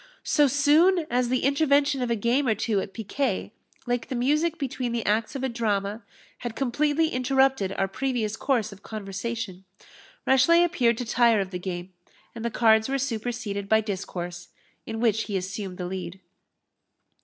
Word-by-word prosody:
So 295 -2 +4
soon 310 +6 +4
as 245 0 +1
the 255 0 0
intervention 280 -1 +3
of 245 - -1
a 235 - +2
game 240 +6 +1
or 220 - +3
two 210 -2 0
at 195 - -5
piquet, 230 +6 -2 0.3
like 245 -1 -1
the 260 - -4
music 300 +7 +1
between 255 -4 -3
the 235 -2 -2
acts 215 +5 0
of 265 - -4
a - - +2
drama, 215 -3 -1 0.4
had 240 -2 -5
completely 295 +4 +1
interrupted 265 -6 +2
our 195 - 0
previous 240 -1 -2
course 230 -4 0
of 200 0 -13
conversation, 205 -1 -5 0.6
Rashleigh 300 +7 +5
appeared 235 -9 +2
to 245 - -3
tire 230 -1 +3
of 195 -1 -3
the 180 - -4
game, 180 0 -6 0.4
and 230 - -7
the 235 - 0
cards 220 0 +3
were 275 - +1
superseded 230 -5 -3
by 220 - +5
discourse, 175 -4 -5 0.4
in 225 0 -4
which 225 -1 +2
he 200 -3 -2
assumed 190 0 -5
the 180 - -4
lead. 180 0 -5
235 Hz, 170 wpm, -26 LUFS, 200-265 Hz, 0.6 s, Rashleigh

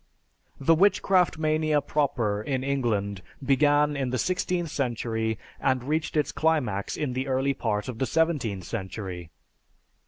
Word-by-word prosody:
The 150 +4 +4
witchcraft 185 0 +3
mania 155 -1 +2
proper 120 -9 0
in 130 +3 -2
England 110 -8 -1 0.2
began 145 +1 +3
in 135 -2 -1
the 130 - -1
sixteenth 180 +1 -1
century 110 -4 -1 0.2
and 130 -2 +1
reached 155 +3 -1
its 150 - +1
climax 130 -12 0
in 145 -5 -2
the 130 +2 -2
early 135 +1 +1
part 105 -5 -2
of 120 -3 -6
the 130 - 0
seventeenth 145 - 0
century. 95 -4 -5
135 Hz, 135 wpm, -26 LUFS, 110-155 Hz, 0.2 s, The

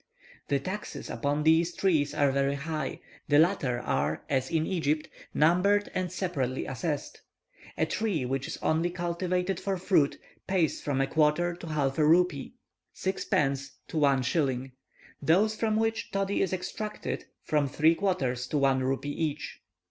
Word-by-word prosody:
The 140 - +1
taxes 190 +9 -5
upon 145 +1 -1
these 165 +2 +3
trees 160 -7 +2
are 140 -1 +3
very 140 +1 +1
high; 155 -1 -4 0.3
the 145 - +4
latter 150 -7 +3
are, 75 - -1
as 130 -2 +1
in 160 -2 +1
Egypt, 155 -4 0 0.2
numbered 180 +6 +3
and 185 -1 -2
separately 145 -9 -2
assessed. 145 +3 -4 0.6
A - - +2
tree 200 - -1
which 135 +1 -2
is - - -5
only 160 +2 +2
cultivated 180 +1 -1
for 195 -1 -1
fruit, 175 -6 +2 0.3
pays 180 -5 +1
from 135 -2 0
a - - +3
quarter 155 +4 +2
to 170 0 -9
half 145 -2 0
a - - +5
rupee 170 - +2 0.4
(6d. 140 -7 0 0.2
to - - -4
1s.); 135 -2 +1 0.5
those 195 +9 +3
from 215 -1 0
which 225 0 0
toddy 195 0 0
is 190 - +1
extracted, 210 +3 -4 0.2
from 150 -2 +1
three 155 +4 +4
quarters 135 -10 -1
to 150 - -1
one 135 -1 +3
rupee 135 +2 -1
each. 150 0 -3
155 Hz, 150 wpm, -28 LUFS, 140-180 Hz, 0.6 s, a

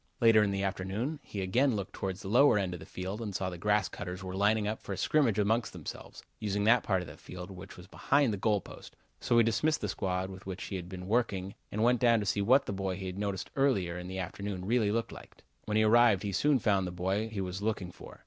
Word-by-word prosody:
Later 115 -2 +6
in 105 - +2
the 100 0 -1
afternoon 100 +10 -2
he 100 - -6
again 125 +7 +2
looked 100 -2 -4
towards 95 0 -4
the - - -6
lower 125 +3 +5
end 95 -3 -1
of 90 - -6
the - - -11
field 95 +4 -5
and 105 -4 -5
saw 95 0 -1
that - - -8
the 90 - -7
grass 105 +1 +2
cutters 90 -1 -6
were 95 0 -5
lining 105 +2 +2
up 110 +1 -3
for 100 - -5
a - - -5
scrimmage 135 -9 +2
among 110 +3 +3
themselves, - - -9 0.2
using 105 -1 -1
that 115 +2 +5
part 95 -4 0
of - - -10
the 75 +1 -11
field, 90 +1 -9
which 95 +1 -10
was 90 - -11
behind 135 +5 +1
the - - -2
goal 105 0 +1
post, - - -12 0.2
so 120 - +2
he 115 - +7
dismissed 150 +8 +1
the 105 - -2
squad 95 0 -2
with 95 0 -11
which 95 -1 -5
he 100 - -5
had 90 -1 -6
been 90 -1 -7
working 100 -4 0 0.2
and 105 +2 -1
went 120 0 +4
down 120 -2 +4
to 105 - -3
see 100 +1 0
what 130 +7 +4
the - - -3
boy 95 -1 -2
he 95 +1 -6
had 95 +1 -5
noticed 100 -2 -3
early 135 -10 +2
in 90 +1 -6
the 95 +1 -5
afternoon 95 0 -4
really 110 -1 +2
looked 115 +1 -1
like. - - -13 0.2
When 105 0 0
he 110 - +4
arrived 110 -2 +5
he 100 - -2
soon 140 +9 +3
found 100 -5 +1
the - - -4
boy 95 +5 -1
he 110 -2 -5
was 95 0 -4
looking 100 -4 -2
for. - - -13
100 Hz, 265 wpm, -31 LUFS, 95-110 Hz, 0.2 s, he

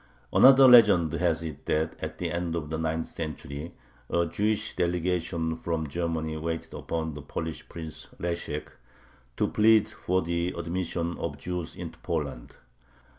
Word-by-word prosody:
Another 135 0 +8
legend 105 -10 +7
has 85 -1 +1
it 75 -3 -7
that 80 +1 0
at - - -5
the - - -2
end 85 -1 -2
of 75 -2 -4
the 80 - -1
ninth 80 0 -1
century 75 0 -6 0.4
a 85 0 +2
Jewish 105 +6 -1
delegation 85 -2 0
from 80 -2 -2
Germany 80 -1 -2
waited 80 +1 -4
upon 80 -1 -3
the 75 - -7
Polish 80 +2 -5
Prince 80 -2 -7
Leshek, 85 -3 -3 0.7
to - - +2
plead 110 0 +5
for 95 -4 -1
the 85 +1 -1
admission 85 0 -2
of 75 -4 -3
Jews 90 +2 -4
into 85 -1 -8
Poland. 75 -8 -4
85 Hz, 145 wpm, -28 LUFS, 80-90 Hz, 0.7 s, Another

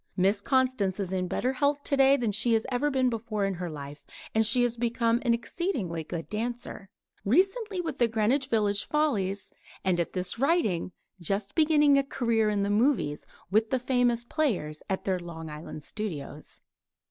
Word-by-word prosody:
Miss 195 +2 +2
Constance 255 -7 +1
is 190 -2 -3
in 185 -1 -1
better 255 +8 -1
health 285 +1 +1
today 275 0 +4
than 235 -5 0
she 220 +3 +2
has 220 -1 +2
ever 265 +4 +1
been 260 -2 +2
before 220 -3 -1
in 195 - -1
her 175 -1 -5
life; 145 -1 -8 0.3
and 220 - +3
she 230 +3 +2
has 240 -1 0
become 235 0 +1
an 235 -2 +3
exceedingly 230 - -3
good 165 +1 -6
dancer 225 -2 -5 0.3
recently 385 - +1
with 320 -5 -5
the 240 - +4
Greenwich 230 +5 +1
Village 210 -4 +1
Follies 210 -11 -1 0.3
and 180 -2 +2
at 170 - -2
this 185 +4 -2
writing 265 - +1 0.3
just 195 +3 -2
beginning 295 -3 +4
a - - +1
career 230 -5 +1
in 205 -1 0
the 200 - 0
movies 215 - +1 0.2
with 215 +2 +3
the 260 - +2
Famous 245 -2 +1
Players 220 - -1
at 190 - -1
their 185 -2 0
Long 165 -2 -8
Island 155 0 -8
Studios. 190 -10 -5
225 Hz, 175 wpm, -28 LUFS, 190-260 Hz, 0.3 s, today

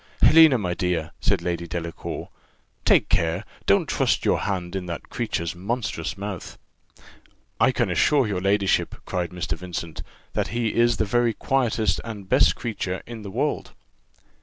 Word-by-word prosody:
"Helena, 160 -4 +8
my 90 -5 -1
dear," 85 -2 -1
said - - +1
Lady 85 -1 -2
Delacour, 85 0 -5 0.6
"take - - +5
care! 85 +4 +1 0.2
don't - - +4
trust - - +1
your - - +3
hand 90 -2 -3
in 95 -2 -3
that 85 -2 -6
creature's 85 -1 -2
monstrous 100 -2 -3
mouth." 100 -3 -6 1.0
"I - - +5
can - - 0
assure 140 -4 +3
your 100 -4 -2
ladyship," 100 0 +2
cried 90 -2 -2
Mr. 85 -3 -3
Vincent, 85 -2 -6 0.3
"that - - 0
he 115 -2 -1
is 120 -1 +3
the 110 - +1
very 120 +2 +2
quietest 115 -7 +1
and 105 -4 -7
best 85 -3 +4
creature 100 -5 -4
in 115 -2 -8
the 100 - -7
world." 140 +9 -2
95 Hz, 155 wpm, -24 LUFS, 85-115 Hz, 1.0 s, Helena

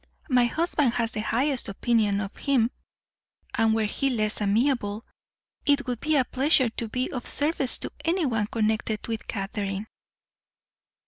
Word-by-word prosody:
My 250 -1 +5
husband 295 -1 +1
has 230 -1 0
the 220 - -3
highest 250 +3 0
opinion 210 -1 +1
of 195 -1 -6
him; 255 -4 +1 0.8
and 225 -1 +2
were 220 - +1
he 270 +6 0
less 215 -4 +1
amiable, 215 0 0 0.6
it 285 -1 +2
would 245 -3 -3
be 310 0 0
a 265 -3 +3
pleasure 265 -1 +3
to 230 +1 -4
be 250 +3 -2
of 250 -2 -5
service 290 -3 +3
to - - -3
anyone 280 - 0
connected 220 -1 -1
with 225 -2 -4
Catherine." 195 0 -3
235 Hz, 145 wpm, -26 LUFS, 215-270 Hz, 0.8 s, My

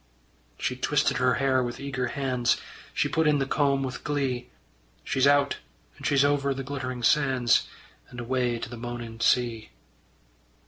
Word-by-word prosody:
She - - -2
twisted - - +1
her 125 0 +3
hair 135 -2 +2
with 120 -1 -4
eager 130 -2 -2
hands, 130 -3 0 0.3
She - - +1
put 160 -1 +1
in 150 -1 +4
the 135 - 0
comb 140 -1 +1
with 130 -1 -5
glee: 135 -4 -2 0.5
She's 130 +1 +2
out 145 0 +3 0.4
and - - -4
she's 140 -1 +4
over 140 -1 +1
the 135 - -4
glittering 130 -3 -5
sands, 130 -3 +3 0.4
And 125 - -9
away 120 0 0
to 115 - -5
the 120 0 -8
moaning 120 -1 -6
sea. 115 -1 +1
130 Hz, 155 wpm, -27 LUFS, 120-140 Hz, 0.5 s, in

